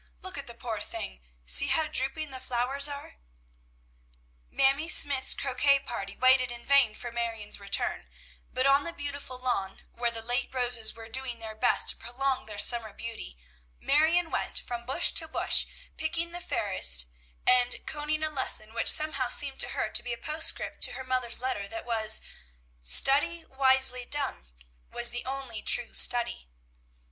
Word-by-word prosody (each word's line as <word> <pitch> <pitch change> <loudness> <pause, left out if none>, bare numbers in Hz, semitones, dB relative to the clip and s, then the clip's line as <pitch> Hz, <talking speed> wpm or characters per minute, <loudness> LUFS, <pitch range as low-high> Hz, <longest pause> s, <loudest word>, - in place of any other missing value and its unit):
Look 375 -1 -8
at 280 -1 -7
the 235 - -11
poor 230 -3 -5
thing! 60 - -7 0.2
See 65 +2 +6
how 320 - +2
drooping 290 +1 -2
the 260 - -8
flowers 255 +3 0
are!" 285 -1 -9 1.3
Mamie 275 +4 +1
Smythe's 280 -5 +5
croquet 275 +1 +2
party 195 -6 -7
waited 255 -1 +3
in 240 0 -10
vain 275 -6 +3
for 240 +1 -8
Marion's 230 -3 -4
return; 200 0 -2 0.4
but 255 +1 -1
on 275 +1 +4
the 335 - -6
beautiful 285 -3 -7
lawn, 240 -7 -3
where 240 0 -1
the 225 -1 -7
late 245 +2 -2
roses 240 -3 -1
were 225 0 -11
doing 250 +1 -2
their 220 -1 -8
best 215 - 0
to - - 0
prolong 265 +2 -3
their 210 -1 -9
summer 225 -1 +4
beauty, 225 - -8 0.4
Marion 320 +4 +1
went - - -1
from 240 -1 -7
bush 335 +6 +3
to 320 - +2
bush, 315 - +3 0.3
picking 335 +2 -3
the 350 +1 -8
fairest, 60 - -1 0.4
and 250 -1 +3
conning 305 0 -3
a 310 - 0
lesson 225 -6 -4
which 230 - -2
somehow 280 -5 +4
seemed 275 0 +2
to - - 0
her - - -2
to - - -1
be 245 - -5
a - - -6
postscript 310 +5 -1
to - - +2
her 265 - -7
mother's 255 -2 -1
letter, 245 -6 -3
that 335 +6 -8
was, 220 -2 +2 0.6
"Study 280 - +5
wisely 265 -2 +1
done 275 - -5 0.4
was 240 0 0
the 245 0 -3
only 260 -4 -6
true 240 - +2
study." 240 - +3
255 Hz, 165 wpm, -28 LUFS, 230-280 Hz, 1.3 s, See